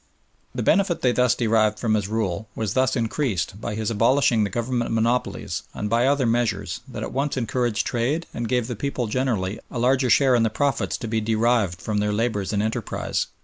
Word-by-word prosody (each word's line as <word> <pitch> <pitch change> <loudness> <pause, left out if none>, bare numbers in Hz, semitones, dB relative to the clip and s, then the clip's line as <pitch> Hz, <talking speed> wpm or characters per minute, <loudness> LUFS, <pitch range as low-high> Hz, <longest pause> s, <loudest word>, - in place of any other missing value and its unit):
The - - -2
benefit 190 -3 +2
they 125 - +4
thus 125 -1 +3
derived 110 -2 +2
from 110 -1 0
his 105 -3 0
rule 110 -2 -2
was 110 -3 -2 0.2
increased 115 - -1
by 105 - -3
his 110 0 -2
abolishing 115 +1 +3
the 100 - -1
Government 120 +3 -2
monopolies 115 +2 -1
and 105 +1 -3
by 120 +2 +3
other 140 -2 +2
measures 115 0 0
that - - -6
at - - -5
once 140 +1 -1
encouraged 120 -2 0
trade 135 +8 -1
and 115 -1 -3
gave 125 -1 +1
the 120 0 -4
people 130 +1 -2
generally 110 -4 -1
a - - -6
larger 130 +2 +2
share 135 +1 +5
in 120 - +4
the 115 - +2
profits 140 +3 -1
to 115 - -6
be 110 0 0
derived 110 -4 +1
from 105 -1 -1
their 105 0 0
labours 105 -2 -1
and 105 -1 0
enterprise. 110 +1 -2
115 Hz, 195 wpm, -23 LUFS, 110-125 Hz, 0.2 s, share